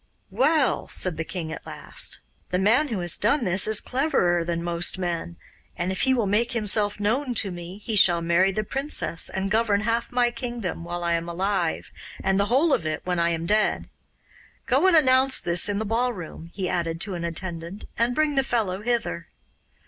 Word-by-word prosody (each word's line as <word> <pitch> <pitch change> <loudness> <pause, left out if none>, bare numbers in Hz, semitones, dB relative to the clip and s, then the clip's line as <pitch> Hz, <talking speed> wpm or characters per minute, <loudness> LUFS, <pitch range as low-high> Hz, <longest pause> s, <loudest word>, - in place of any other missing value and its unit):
'Well,' 290 -1 +2
said 180 -4 +1
the 160 - -2
king 165 -1 -5
at - - -7
last, - - -1 0.3
'the 180 - 0
man 225 +10 +3
who 220 -8 -3
has 175 -2 +2
done 240 +6 +2
this 185 0 +3
is 215 -1 +5
cleverer 180 - +1
than 170 0 -3
most 170 +1 0
men, 175 -2 -3 0.4
and 175 +2 -1
if 190 - -3
he 265 - +3
will 235 -4 +1
make 225 +5 +1
himself 210 -2 0
known 245 +5 0
to 205 -3 +1
me 175 +2 -8
he 225 - -3
shall 180 -4 +5
marry 170 +3 +2
the 215 +3 -2
princess 270 - -1
and 190 0 -3
govern 215 -2 +2
half 230 +2 -1
my 245 -1 +2
kingdom 240 -9 -5
while 175 0 -5
I 170 0 +1
am 170 0 -2
alive, 185 -1 -2 0.3
and 195 0 +1
the 200 - +3
whole 275 +7 +3
of - - +1
it 155 0 -3
when 180 -1 -1
I 170 0 +2
am 165 -1 -2
dead. 215 +4 +1 0.8
Go 270 +8 +3
and 370 - +5
announce 260 -2 +4
this 175 +3 +1
in 205 - -1
the 220 - -2
ballroom,' 220 -8 -3
he 190 -1 -3
added 165 -2 -2
to 200 - -1
an 170 -1 -4
attendant, 170 +2 -5
'and 235 +1 0
bring 310 0 +1
the 270 -1 +2
fellow 210 -7 -1
hither. 230 - -2
200 Hz, 200 wpm, -24 LUFS, 175-240 Hz, 0.8 s, is